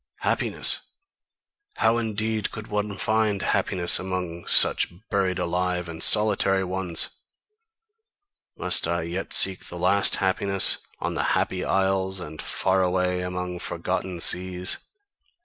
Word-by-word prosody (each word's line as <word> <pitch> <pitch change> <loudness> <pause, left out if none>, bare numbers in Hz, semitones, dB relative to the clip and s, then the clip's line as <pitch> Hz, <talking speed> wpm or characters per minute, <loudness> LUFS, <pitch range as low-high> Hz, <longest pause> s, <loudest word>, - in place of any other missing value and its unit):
Happiness - - +2 0.9
how 115 +1 +2
indeed 110 -1 -2
could 110 -1 -7
one 105 -1 -3
find 110 -1 0
happiness 90 -1 +2
among 90 -2 -5
such - - +5 0.2
buried 95 -2 0
alive 90 0 -2
and 80 -1 -9
solitary 100 -2 +3
ones! 90 -2 -1 1.5
Must 90 -2 +2
I 85 0 -1
yet 90 +4 -5
seek 95 -1 +3
the 90 - -8
last 95 +3 +3
happiness 95 0 +2 0.2
on - - -3
the - - -2
Happy 90 -1 -2
Isles, 95 0 -1
and 80 -3 -8
far 95 0 0
away 90 0 0
among 90 0 -5
forgotten 90 0 -4
seas? 90 +1 +1
95 Hz, 120 wpm, -24 LUFS, 90-100 Hz, 1.5 s, such